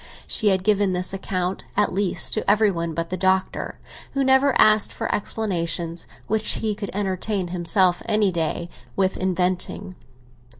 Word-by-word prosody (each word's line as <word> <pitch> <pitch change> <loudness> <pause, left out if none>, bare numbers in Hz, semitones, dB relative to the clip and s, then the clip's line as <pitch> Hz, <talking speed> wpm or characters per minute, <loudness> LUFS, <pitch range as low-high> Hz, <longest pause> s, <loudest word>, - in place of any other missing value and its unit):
She 220 - +1
had 190 -2 +3
given 205 -2 +2
this 180 +1 -1
account, 185 -1 -3
at 210 - +2
least, 195 0 +2
to 215 - -1
every 210 0 +4
one 170 -2 -4
but 165 +1 -3
the 185 - -2
Doctor, 190 +1 -1 0.3
who 275 - 0
never 265 0 +3
asked 215 -1 +5
for - - -3
explanations 170 -5 -2 0.2
which 220 0 +1
he 220 -1 -2
could 205 -1 -6
entertain 190 -1 -2
himself 180 +1 +2
any 210 -2 +2
day 170 0 -2 0.3
with 190 -1 +1
inventing. 185 +1 -1
190 Hz, 155 wpm, -22 LUFS, 180-210 Hz, 0.3 s, asked